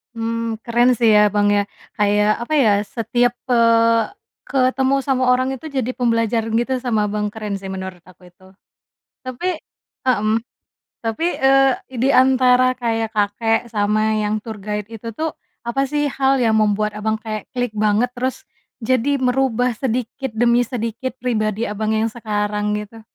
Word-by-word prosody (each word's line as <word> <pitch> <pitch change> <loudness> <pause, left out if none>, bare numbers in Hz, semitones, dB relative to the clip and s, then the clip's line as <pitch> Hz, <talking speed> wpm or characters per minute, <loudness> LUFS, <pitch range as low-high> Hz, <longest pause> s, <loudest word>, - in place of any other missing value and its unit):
Mmm, 230 0 -2
keren 240 +1 +3
sih 230 -1 +3
ya, 210 0 +6
Bang, 205 0 +2
ya, 205 0 +1 0.3
kayak 210 +1 +2
apa 240 +6 -4
ya, 255 -8 +4 0.2
setiap 245 +1 +1 0.2
eee, 230 -1 +4 0.4
ketemu 265 0 +2
sama 260 -2 +1
orang 255 +1 +2
itu 315 - -8
jadi 260 -4 -2
pembelajaran 230 -2 0
gitu 240 +3 0
sama 235 -4 0
Abang, 210 0 -1
keren 210 -1 -5
sih 195 - -8
menurut 190 -1 -6
aku 180 0 -17
itu. 190 +2 -21 0.7
Tapi 320 +7 -3 0.5
mhm, 220 -3 +2 0.6
tapi, 225 +7 -3 0.2
eee, 270 0 +5 0.3
di 265 - +3
antara 255 -1 +4
kayak 225 -2 -1
kakek 210 +2 +1
sama 215 +1 +1
yang 210 0 -2
tour 220 -2 -7
guide 210 +2 -5
itu 225 +1 -7
tuh, 320 0 -2 0.3
apa 270 +3 -1
sih 295 +1 0
hal 270 -1 +1
yang 225 - +3
membuat 210 0 +1
Abang 215 +1 -2
kayak 215 -1 -6
klik 245 -2 -1
banget 215 +3 +1
terus 255 +1 -3 0.4
jadi 255 +4 +1
merubah 250 -2 +1
sedikit 250 +2 -3
demi 240 +1 +3
sedikit 235 +1 -4
pribadi 220 -3 -1
Abang 215 0 -1
yang 220 0 0
sekarang 210 -2 -2
gitu? 210 +2 -8
230 Hz, 155 wpm, -20 LUFS, 210-255 Hz, 0.7 s, ya